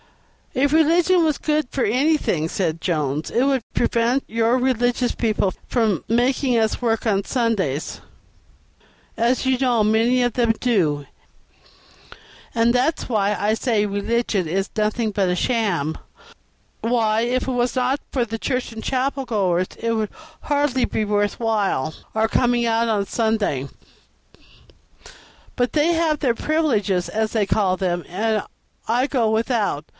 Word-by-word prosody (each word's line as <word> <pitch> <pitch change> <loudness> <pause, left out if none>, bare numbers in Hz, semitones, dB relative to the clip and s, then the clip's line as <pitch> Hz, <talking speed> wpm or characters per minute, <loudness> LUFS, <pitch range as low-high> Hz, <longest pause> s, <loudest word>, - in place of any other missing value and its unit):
"If 280 +3 +1
religion 335 +3 +4
was 310 -3 +1
good 305 -2 0
for 265 - -1
anything," 250 - +1
said 165 -4 -2
Jones, 150 -3 -1
"it 240 - +1
would 270 -2 +2
prevent 240 +3 +1
your 230 +2 +1
religious 245 -1 +1
people 215 -4 0
from 220 - 0
making 245 +2 +2
us 220 +1 0
work 225 -2 0
on 200 -3 +1
Sundays, 200 - -1 1.1
as 235 +3 +1
you 260 -1 +2
know 245 -4 +2
many 230 +4 +3
of 245 -2 0
them 235 -2 +2
do, 160 - +1 1.5
and 235 0 +3
that's 260 +6 0
why 210 -4 +1
I 210 +1 +1
say 220 -2 +1
religion 205 -1 -1
is 190 +5 -1
nothing 215 +1 0
but 195 -2 0
a 180 - +1
sham; 190 - 0 0.8
why, 225 -2 +1
if 250 +2 -1
it - - 0
was 245 0 0
not 255 +3 +1
for 250 -3 0
the 225 0 -5
church 250 -2 -2
and 225 - -8
chapel 270 +1 -1
goers 185 -7 0
it 230 0 -1
would 215 -2 -1
be - - -25 0.3
hardly 285 -3 +1 0.2
worth 205 0 0
while 205 - 0 0.2
our 220 0 +2
coming 240 +1 +1
out 230 0 +1
on 210 -2 +1
a - - -9
Sunday. 205 - -1 1.9
But 245 -1 0
they 310 +3 +3
have 325 -3 +1
their 250 -5 +1
privileges, 220 - 0
as 220 0 -1
they 215 -3 +1
call 190 -2 +1
them, 175 -2 -1
and 215 +4 0 0.4
I 245 +4 +1
go 240 -6 +1
without. 220 - 0
230 Hz, 150 wpm, -21 LUFS, 205-255 Hz, 1.9 s, religion